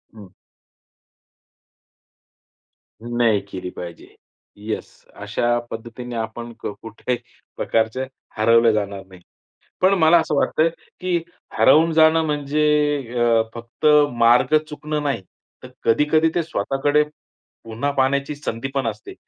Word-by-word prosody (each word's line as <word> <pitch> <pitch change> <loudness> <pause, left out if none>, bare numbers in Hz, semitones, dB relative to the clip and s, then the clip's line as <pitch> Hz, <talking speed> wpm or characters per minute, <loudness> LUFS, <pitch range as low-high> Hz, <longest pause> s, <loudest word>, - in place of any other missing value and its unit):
हं. 100 -3 -13 2.7
नाही 120 -3 +1
केली 90 -1 -5
पाहिजे. 85 -1 -8 0.5
येस. 105 +1 -6
अशा 120 0 -1
पद्धतीने 120 +2 -7
आपण 115 +1 -5
क - - -5
कुठेही 115 +2 -3 0.4
प्रकारचे 115 +3 0 0.3
हरवले 115 +1 +5
जाणार 100 -2 -3
नाही. 95 -1 -16 0.6
पण 185 +1 +4
मला 160 +1 +6
असं 155 - -2
वाटतं 155 - +1
आहे 165 - +3 0.3
की 180 -1 0 0.4
हरवून 160 +2 +5
जाणं 160 0 +5
म्हणजे 150 0 0 0.5
अ, 115 -1 +4
फक्त 120 +5 -5 0.3
मार्ग 120 +6 +4
चुकणं 150 0 -4
नाही. 140 -8 -1 0.4
तर - - -10 0.2
कधी-कधी 150 +7 +3
ते 175 - +1
स्वतःकडे 145 +1 +1 0.6
पुन्हा 115 +6 -2
पाहण्याची 140 +2 +1
संधी 135 -3 -4
पण 135 -3 0
असते. 110 -1 -6
120 Hz, 115 wpm, -21 LUFS, 115-150 Hz, 2.7 s, मला